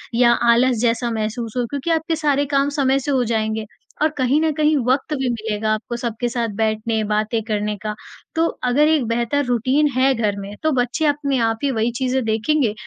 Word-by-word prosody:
या 240 0 +5 0.2
आलस 245 +1 +3
जैसा 240 0 +1
महसूस 220 +1 -3
हो 245 - +1
क्योंकि 285 +3 -4
आपके 325 0 0
सारे 290 -2 +1
काम 275 +1 +3
समय 270 -1 +2
से 285 +2 -3
हो 255 -2 +2
जाएँगे, 220 -1 -1 0.4
और 310 - +4
कहीं 260 +2 +2
न 320 -1 +2
कहीं 305 +1 +2
वक़्त 265 +4 +1
भी 265 -3 -1
मिलेगा 220 -2 -1
आपको 225 +2 -4
सबके 240 0 -3
साथ 235 -2 -2
बैठने 220 +1 0
बातें 215 +2 0
करने 210 -1 -1
का। 210 0 -3 0.4
तो 330 +1 +2 0.2
अगर 265 +5 +3
एक 310 -5 +2
बेहतर 235 +5 0
रूटीन 255 +5 +2
है 265 +1 +4
घर 210 -3 0
में 200 +1 -7
तो 315 - +2
बच्चे 245 +6 -1
अपने 285 -2 +1
आप 225 - -3
ही 280 - +2
वही 230 -1 0
चीज़ें 260 0 +1
देखेंगे 225 +2 +1
245 Hz, 200 wpm, -20 LUFS, 220-280 Hz, 0.4 s, या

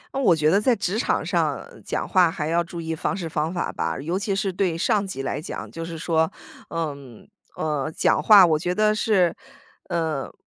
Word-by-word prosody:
嗯， 270 - 0
我 185 -8 +5
觉 155 0 +2
得 200 +4 +3
在 245 +2 +3
职 200 +1 -2
场 - - 0
上 - - -1 0.2
讲 - - -3
话 180 -3 +4
还 155 -2 -4
要 170 +2 +1
注 170 0 -8
意 165 -1 -3
方 180 +3 -2
式 175 -4 -4
方 155 0 -2
法 175 -1 -2
吧， - - -2
尤 165 +6 -2
其 200 -1 -1
是 195 -1 -1
对 180 -3 0
上 200 +3 +1
级 135 -8 -5
来 135 - -3
讲。 155 - -7
就 165 - -6
是 165 0 -6
说， 160 0 +1 0.4
呃， 165 -3 -3 0.6
呃， 150 -1 -2
讲 - - +3
话 205 -4 +8
我 160 -3 +2
觉 180 +2 -2
得 215 +1 +3
是 195 -5 +2 0.5
呃， 160 -5 -2
170 Hz, 225 characters per minute, -23 LUFS, 160-195 Hz, 0.6 s, 话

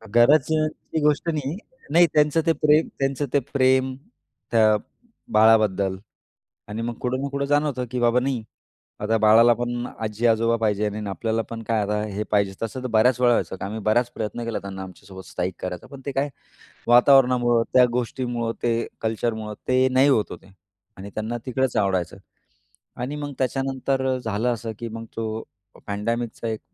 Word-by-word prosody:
गरजची 155 +5 +3
गोष्ट 150 +3 +2
नाही. 150 +2 -2 0.3
नाही 170 +1 +6
त्यांचं 150 +2 +3
ते 165 - +4
प्रेम 150 +2 +3
त्यांचं 135 +1 0
ते 140 - +5
प्रेम 130 -1 +3 0.6
त्या 110 -2 +5 0.6
बाळाबद्दल 105 -3 +4 0.7
आणि 110 +2 -4
मग 120 0 -3
कुठं 130 +1 -1
ना 140 - -2
कुठं 140 0 -2
जाणवतं 145 -3 +1
की 125 -1 -2
बाबा 120 +1 +3
नाही 130 -3 -1 0.6
आता 110 +2 +1
बाळाला 115 +2 +6
पण 120 +1 -3
आजी-आजोबा 115 +1 +1
पाहिजे 105 -1 +1
आणि 105 0 -4
आपल्याला 115 +3 -1
पण 115 -1 -6
काय 110 -1 0
आता 105 +1 -1
हे 105 +2 -2
पाहिजे. 100 -2 +2
तसं 125 +3 -4
तर - - -3
बऱ्याच 120 +3 +3
वेळा 120 -1 +5
व्हायचं 95 -4 -1
आम्ही 105 +3 -4
बराच 120 +4 +1
प्रयत्न 115 +2 -4
केला 115 -1 -2
त्यांना 95 -1 -7
आमच्यासोबत 95 0 -11
स्थाईक 90 +3 -3
करायचा. 90 -1 -5
पण 140 -1 -11
ते 140 - -2
काय 140 +2 0 0.6
वातावरणामुळं, 125 -2 +5
त्या 125 -1 +7
गोष्टीमुळं, 120 -1 -2
ते 115 -1 0
कल्चरमुळं 110 -1 -2
ते 130 +1 +4
नाही 135 +2 +5
होत 110 -6 +3
होते 95 0 -11 0.4
आणि 100 +2 -9
त्यांना 110 +2 -3
तिकडंच 130 -1 -1
आवडायचं. 95 -3 0 0.8
आणि 130 +5 -4
मग 145 -1 -5
त्याच्यानंतर 135 0 -1
अ, - - -2
झालं 110 0 -2
असं 115 0 -6
की 120 -1 -5
मग 115 +1 -7
तो 110 0 -3 0.4
पँडेमिकचा 115 +3 -3
एक 110 -1 -3
120 Hz, 165 wpm, -23 LUFS, 110-130 Hz, 0.8 s, त्या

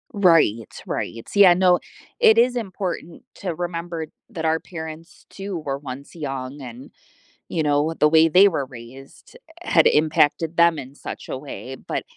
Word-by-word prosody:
Right, 165 - +3 0.2
right. 115 0 -4
Yeah, 200 -3 +7
no, 180 -1 +3 0.4
it 220 - +6
is 245 +2 +4
important 185 -5 -5
to 180 -4 -4
remember 170 -1 -4 0.2
that 175 -9 -6
our 160 0 +2
parents, 160 0 -10
too, 195 -1 -6
were 140 -4 -4
once 140 +1 -9
young, 135 -2 -5
and, 125 0 -10 0.6
you 160 - -2
know, 145 -1 +2
with 160 +1 -4
the 150 - +5
way 160 +1 +5
they 185 +5 +6
were 145 -6 -2
raised, 130 - -14 0.2
eh, - - -7
had 160 - +5
impacted 155 +1 +2
them 170 -1 +5
in 135 -1 -9
such - - -8
a - - -3
way, 130 -1 -8
but - - -5
160 Hz, 170 wpm, -22 LUFS, 140-175 Hz, 0.6 s, Yeah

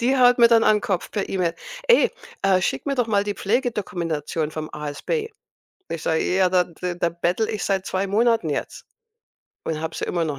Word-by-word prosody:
Die 260 +3 +2
haut 245 -1 +5
mir 235 -1 +7
dann 230 -1 +5
an 215 -1 +4
Kopf 185 -3 -2
per 205 - -2
E-Mail: 175 -3 0 0.3
„Ey, 480 - +6 0.3
äh, 190 -2 +3
schicke 135 - -1
mir 275 - +1
doch 245 -3 +1
mal 205 -2 +2
die 205 0 -3
Pflegedokumentation 175 - -2
vom 155 0 -6
ASB.“ 150 - -3 0.6
Ich 165 - -5
sage: 160 0 +1
„Ja, 185 0 +2
d 180 -2 +1
da 180 -1 -2
da 175 0 0
bettele 175 +6 -1
ich 210 - -3
seit 190 -1 0
2 190 +1 -1
Monaten 225 -4 +2
jetzt. 145 - -4 0.8
Und 155 -1 -3
habe 160 0 -4
sie - - -3
immer 170 -1 -1
noch 145 -3 -3
190 Hz, 200 wpm, -23 LUFS, 165-225 Hz, 0.8 s, mir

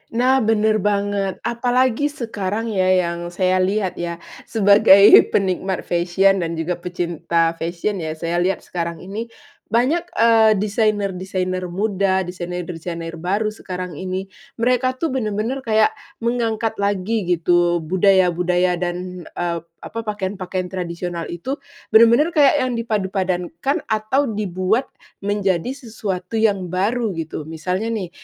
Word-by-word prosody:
Nah, 255 +3 +4
bener 220 -2 +2
banget, 200 -1 0
apalagi 250 +3 +1
sekarang 225 -5 -3
ya 185 -3 +1 0.2
yang 170 0 -4
saya 185 +1 +1
lihat 190 0 0
ya, 170 0 -3 0.3
sebagai 200 -2 +6 0.3
penikmat 190 -1 0
fashion 180 +3 +2
dan 170 -1 -2
juga 165 +2 -2
pecinta 170 -1 -1
fashion 175 +4 -2
ya, 160 -2 -4
saya 170 +2 -2
lihat 185 +1 0
sekarang 170 -2 -4
ini 210 +5 -5 0.4
banyak, 280 +10 +1
eee, 225 -1 +5
desainer-desainer 190 -3 -1
muda, 190 0 0
desainer-desainer 175 -2 -6
baru 200 +5 0
sekarang 180 -6 -7
ini, 185 +1 -4 0.2
mereka 250 +2 +1
tuh 320 +3 -2
benar-benar 225 +1 -2
kayak 220 -4 +2 0.3
mengangkat 230 -2 0
lagi 200 0 -1
gitu, 175 0 +2
budaya-budaya 180 0 +2
dan, 180 0 -4
eee, 170 -1 -3 0.2
apa, 230 - -6
pakaian-pakaian 190 -3 -3
tradisional 175 -2 -4
itu, 175 +11 -4 0.4
benar-benar 235 +9 +6
kayak 290 -2 +4
yang 255 -1 -1
dipadupadankan 190 - -1
atau 220 +6 +1
dibuat 210 +1 -1 0.3
menjadi 200 -1 0
sesuatu 220 -8 -5
yang 210 -4 +2
baru, 210 +4 0
gitu. 160 -2 -5
Misalnya 180 +7 -3
nih 190 -6 -3
190 Hz, 120 wpm, -20 LUFS, 180-220 Hz, 0.4 s, sebagai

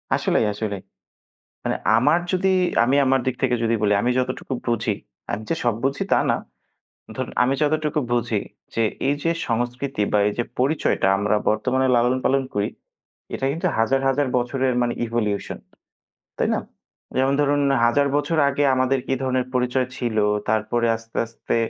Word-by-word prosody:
আসলেই, 110 - +1
আসলেই। 105 -2 -4 0.8
মানে - - -1 0.2
আমার 145 +8 +4
যদি, 190 +1 +2 0.3
আমি 130 +4 +2
আমার 135 0 +3
দিক 130 -1 0
থেকে 125 -2 +3
যদি 115 0 +2
বলি। 105 -1 +3
আমি 125 - +1
যতটুকু 130 +1 -3
বুঝি, 115 -3 0 0.4
আমি 110 +2 -3
যে - - +1
সব 120 -3 +1
বুঝি, 135 +1 0
তা - - +5
না। - - +1 0.8
ধরুন - - -4
আমি 130 +2 +2
যতটুকু 150 0 +1
বুঝি, 120 -1 0 0.3
যে 115 - 0 0.3
এই 140 - +3
যে 165 - +2 0.2
সংস্কৃতি 120 +1 -2
বা 105 - +3
এই 105 - -1
যে 120 - +2 0.2
পরিচয়টা 135 -7 +1
আমরা 105 +1 +1
বর্তমানে 130 +5 +1
লালন 125 +2 +2
পালন 135 0 +3
করি, 105 0 0 0.7
এটা 135 - -2
কিন্তু 165 - -1
হাজার, 135 +4 +2
হাজার 135 +1 +1
বছরের 130 +1 0
মানে 120 0 0
ইভোলিউশন। 110 -3 -2 0.8
তাই - - +1
না? - - 0 0.6
যেমন 135 +1 +2
ধরুন 145 0 +2 0.2
হাজার 140 +4 +3
বছর 145 +3 0
আগে 145 +1 0
আমাদের 130 +1 +2
কি 135 - +1
ধরনের 130 -1 0
পরিচয় 125 0 +1
ছিল? 120 -3 -2 0.3
তারপরে 110 +2 +1
আস্তে, 115 0 -11
আস্তে 115 +1 -4
125 Hz, 165 wpm, -22 LUFS, 115-135 Hz, 0.8 s, তা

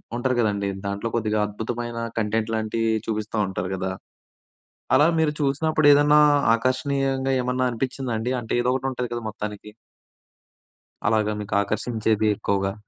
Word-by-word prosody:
ఉంటారు 125 +1 0
కదండీ. 100 -3 0 0.2
దాంట్లో 100 +3 -2
కొద్దిగా 110 -2 0
అద్భుతమైన 115 +3 -5 0.2
కంటెంట్ 110 +1 0
లాంటియి 110 +1 0
చూపిస్తా 110 0 -3
ఉంటారు 90 -1 -4
కదా! 95 0 -3 1.0
అలా 145 +4 +6
మీరు 155 -2 +2
చూసినప్పుడు 150 +2 +1
ఏదన్నా 145 +1 +5 0.3
ఆకర్షణీయంగా 135 +2 0
ఏమన్నా 125 +1 0
అనిపించిందా 130 +1 -3
అండి? 120 +3 -2
అంటే 115 - -6
ఏదో 120 - 0
ఒకటి 135 0 -1
ఉంటుంది 125 -1 -3
కదా 120 - -3
మొత్తానికి. 105 0 -6 1.4
అలాగా 110 -2 +2
మీకు 100 -1 -4
ఆకర్షించేది 110 0 0
ఎక్కువగా? 95 -1 -1
115 Hz, 130 wpm, -24 LUFS, 105-130 Hz, 1.4 s, అలా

